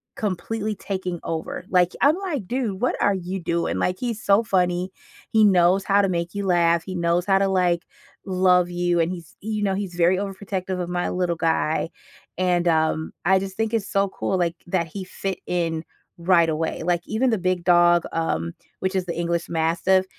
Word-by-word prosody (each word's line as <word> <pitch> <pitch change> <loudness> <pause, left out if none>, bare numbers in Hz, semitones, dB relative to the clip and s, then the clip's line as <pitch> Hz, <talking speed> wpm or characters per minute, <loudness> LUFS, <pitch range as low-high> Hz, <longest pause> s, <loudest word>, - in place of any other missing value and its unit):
completely 215 +2 -2
taking 185 -3 -4
over. 160 +2 -4
Like, 180 -1 +3
I'm, 290 +3 +5
like, 320 - -4
"Dude, 230 -5 -2
what 250 - +1
are 200 - +3
you 190 0 -4
doing?" 170 -1 -1
Like, 180 0 -1
he's 235 -2 -3
so 200 +3 +4
funny, 180 -2 0 0.4
he 220 -1 +5
knows 185 0 +4
how 200 +1 +4
to 195 - +1
make 170 -1 -2
you 200 -1 -3
laugh, 170 -2 +3
he 185 - -6
knows 170 0 +1
how 195 -1 +4
to, 195 0 +2
like, 180 -3 +1 0.4
love 180 -2 +3
you, 175 0 +1
and 165 +1 +1
he's 170 -4 -9
you 215 0 -3
know, 195 -1 +1
he's 195 -2 -4
very 175 +2 +3
overprotective 190 -1 -4
of 175 - -4
my 175 0 -1
little 180 -2 0
guy, 160 0 0 0.5
and, 175 -1 +1
um, 160 -1 +1
I 190 +1 +5
just 190 0 -6
think 225 0 -1
it's 215 -3 0
so 195 0 +1
cool, 190 - -2
like, 170 -2 0
that 175 -2 0
he 190 +5 -6
fit 190 0 -4
in 165 -2 -1 0.3
right 170 -1 +3
away. 160 +1 -2
Like, 175 0 +1
even 240 +4 +1
the 225 - +1
big 185 -1 -1
dog, 175 -1 +5
um, 85 - -1 0.3
which 190 +1 -2
is 185 -1 0
the 170 -2 -4
English 170 0 -1
Mastiff, 170 +3 +2
180 Hz, 195 wpm, -23 LUFS, 170-195 Hz, 0.5 s, I'm